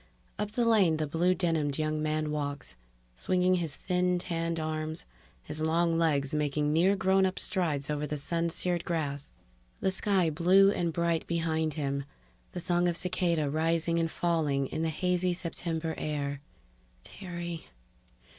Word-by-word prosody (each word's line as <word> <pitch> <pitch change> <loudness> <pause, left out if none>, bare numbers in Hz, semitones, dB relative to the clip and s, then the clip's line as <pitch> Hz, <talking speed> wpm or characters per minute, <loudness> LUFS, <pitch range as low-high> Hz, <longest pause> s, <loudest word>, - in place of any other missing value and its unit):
_ - - -30 0.4
Up 210 - -4
the 240 0 +1
lane 195 -8 +4
the 155 - 0
blue 170 +5 +2
denimed 160 -5 0
young 155 0 -1
man 155 0 -1
walks, 145 - -4 0.4
swinging 180 - +2
his 165 -6 -1
thin 180 +1 0
tanned 165 -1 -2
arms, 155 0 -3 0.4
his 155 - -2
long 165 +1 +2
legs 150 -4 +1
making 150 0 0
near 180 +5 +4
grownup 190 -1 +2
strides 155 -8 -1
over 150 0 -2
the 150 - -3
sun 170 +4 -1
seared 175 +1 -1
grass; 145 -4 -3 0.5
the 190 - +1
sky 190 -3 +2
blue 185 +5 +5
and 170 -4 -1
bright 170 0 0
behind 160 -2 0
him, 140 -2 -2 0.5
the - - -4
song 175 0 +1
of 170 -1 +1
cicada 170 -4 0
rising 165 +3 +1
and 165 0 +1
falling 155 -6 0
in 155 - -4
the 165 - +1
hazy 180 +2 0
September 165 -2 -3
air 145 -2 -3 0.6
_Terry 175 -3 -6
165 Hz, 155 wpm, -29 LUFS, 155-175 Hz, 0.6 s, blue